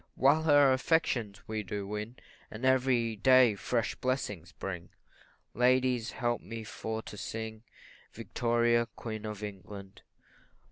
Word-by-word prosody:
While 145 +4 +4
her 145 -4 +6
affections 125 - 0
we 110 -1 -2
do 100 0 -4
win, 105 +4 -5 0.3
And 110 +4 -5
every 125 -3 +3
day 130 0 +6
fresh 115 +3 -1
blessings 125 - -3
bring, 90 -3 -6 0.6
Ladies, 125 -1 +2
help 120 -1 -1
me 115 -1 -7
for 110 +1 -5
to 105 - -9
sing 110 +1 -5 0.5
Victoria, 120 0 +1
Queen 110 -2 -5
of 105 -1 -6
England. 100 0 -8
115 Hz, 125 wpm, -31 LUFS, 105-130 Hz, 0.6 s, her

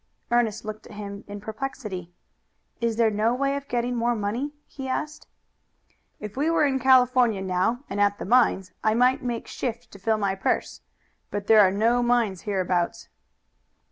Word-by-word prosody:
Ernest 235 -3 +1
looked 215 0 -7
at - - -12
him 200 0 -7
in 205 0 -7
perplexity. 210 -5 -6 0.7
"Is 230 -1 0
there 225 -1 +3
no 220 +3 +1
way 275 +1 0
of 280 0 -5
getting 245 0 -1
more 240 0 +1
money?" 230 +7 -2
he 270 -2 -8
asked. 300 +4 -4 0.9
"If 210 -1 -7
we 290 +5 +1
were 330 -2 +3
in 265 -2 +1
California 250 -4 +4
now 190 +7 0
and 205 +1 -2
at 205 0 +3
the - - -6
mines, 200 -4 +3
I 215 0 +3
might 255 +4 +3
make 240 -3 -3
shift 240 -1 -5
to 200 - -12
fill 220 +3 +1
my 200 -2 0
purse; 195 - -2 0.5
but 205 -1 -4
there 220 +1 +6
are 190 - +6
no 225 +5 +2
mines 235 -6 +1
hereabouts." 180 -3 -1
225 Hz, 170 wpm, -25 LUFS, 205-250 Hz, 0.9 s, there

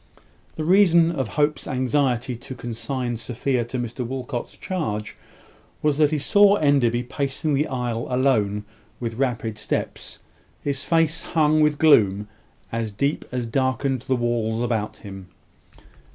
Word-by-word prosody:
The 155 - -3
reason 170 -2 +5
of 135 -7 -2
Hope's 150 +4 0
anxiety 130 -2 0
to 120 +3 -9
consign 120 0 -4
Sophia 125 +2 -1
to 125 +2 -5
Mr 120 +1 -4
Walcot's 125 -1 -5
charge 110 - -3 0.7
was, 150 -1 +1
that 150 -2 +5
he 155 - 0
saw 205 +7 +5
Enderby 135 - +2
pacing 140 +4 -2
the 145 +3 +1
aisle 120 -3 -3
alone 110 -6 +1 0.3
with 115 -1 -4
rapid 115 -5 -1
steps, - - -4 0.5
his 140 -1 -1
face 165 -1 +2
hung 155 -1 +2
with 150 -1 +3
gloom 105 -10 +4 0.4
as 115 -1 -2
deep 140 +9 -1
as 125 -1 -2
darkened 130 +1 0
the 130 +1 0
walls 120 -1 -1
about 115 -3 -2
him. 95 -2 -10
130 Hz, 135 wpm, -23 LUFS, 115-145 Hz, 0.7 s, reason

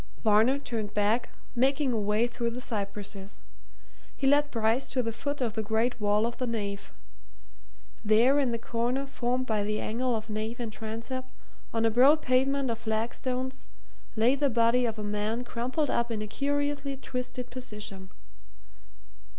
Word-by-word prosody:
Varner 220 +5 +5
turned 225 -6 -4
back, 210 +3 +2 0.2
making 270 +1 +2
a 225 - +1
way 210 +2 +2
through 235 -1 -2
the 235 +2 -5
cypresses. 200 -3 -3 0.8
He 275 - -2
led 290 +2 +4
Bryce 225 +2 +1
to 255 -1 0
the 230 - -1
foot 285 +4 -3
of 235 -4 0
the 220 - -1
great 225 +2 0
wall 210 +1 +3
of 235 0 -3
the 255 - -2
nave. 200 -3 -3 1.1
There 230 +6 +5
in 265 -4 +2
the 230 - 0
corner 240 +4 -1
formed 255 -1 -1
by 220 -4 0
the 210 +1 -1
angle 245 +2 0
of 220 0 -4
nave 220 +2 -3
and 230 -3 -4
transept, 230 +4 -5 0.4
on 225 0 +1
a 225 - +3
broad 275 +7 +6
pavement 265 0 +2
of 225 - -4
flagstones, 250 +4 -2 0.5
lay 230 +3 +4
the 280 0 +2
body 235 +1 +3
of 225 -1 -3
a 210 - -4
man 210 +3 -1
crumpled 255 +5 -1
up 235 0 +1
in 220 -2 -2
a - - -5
curiously 285 +2 -1
twisted 250 -1 -5
position. 210 -6 -5
235 Hz, 165 wpm, -29 LUFS, 215-255 Hz, 1.1 s, broad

